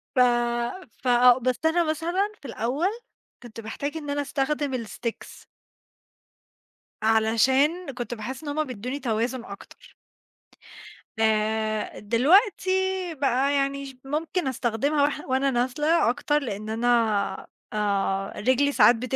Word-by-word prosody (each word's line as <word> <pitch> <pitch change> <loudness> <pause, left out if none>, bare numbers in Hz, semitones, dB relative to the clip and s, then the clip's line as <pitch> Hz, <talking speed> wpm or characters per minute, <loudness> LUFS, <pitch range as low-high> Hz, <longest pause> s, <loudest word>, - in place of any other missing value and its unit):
ف - - +2 0.8
فآه، 245 0 +6
بس 255 0 -1
أنا 335 +2 +3
مثلًا 345 +7 -1
في - - -16
الأول، 255 - -1 0.5
كنت 230 -1 -9
باحتاج 280 +7 -5
إن 295 -2 -5
أنا 290 0 -1
أستخدم 275 -2 -2
الsticks. 225 +2 -7 1.6
علشان، 260 +9 +2
كنت 240 -1 -5
باحس 250 +6 -6
إن 290 - -5
هُم 310 +2 0
بيدوني 255 +1 -5
توازن 235 +1 -1
أكتر. 200 - -12 1.3
آآ 215 0 0
دلوقتي، 360 - +3 0.5
بقى 275 0 +1
يعني 275 0 -1
ش 270 -1 -10
ممكن 315 +3 -2
أستخدمها 265 +4 0
واح 290 0 0
وأنا 265 +1 +2
نازلة 265 +5 +2
أكتر، 290 +4 +1
لإن 215 -2 -5
أنا 230 +2 -1 0.9
آآ 195 -2 -1
رجلي 260 +6 +2
ساعات 240 -3 +6
بت 255 +3 -3
260 Hz, 120 wpm, -25 LUFS, 225-290 Hz, 1.6 s, فآه